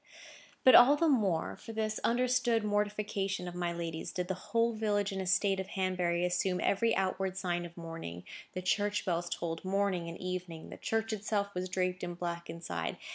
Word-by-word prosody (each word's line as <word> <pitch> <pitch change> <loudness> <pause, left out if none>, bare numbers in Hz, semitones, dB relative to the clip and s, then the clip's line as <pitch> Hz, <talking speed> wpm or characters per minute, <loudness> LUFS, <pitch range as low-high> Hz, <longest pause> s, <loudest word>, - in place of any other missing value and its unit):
But 255 - +8
all 260 +4 +9
the 330 +3 +2
more, 205 - +2
for 225 - -9
this 215 -1 -1
understood 240 -1 +2
mortification 205 -2 -1
of 175 - -5
my 175 -1 -1
lady's, 165 -1 -4
did 180 0 -3
the - - +1 0.2
whole 230 0 +2
village 205 -2 0
and 195 0 -3
estate 190 +1 +2
of 190 - -3
Hanbury 180 -2 0
assume 180 +1 0
every 225 +3 +2
outward 190 0 -1
sign 175 -2 -1
of 170 - -19
mourning. 165 - -7 0.3
The 185 - -4
church 205 +2 +1
bells 175 -2 -1
tolled 165 -1 -3
morning 190 -3 0
and 170 - -7
evening. 180 -3 -5
The - - -8
church 225 0 -1
itself 205 -1 -1
was 180 0 -3
draped 185 0 -1
in 175 0 -3
black 170 -1 -4
inside. 85 - -4
190 Hz, 185 wpm, -32 LUFS, 175-210 Hz, 0.3 s, all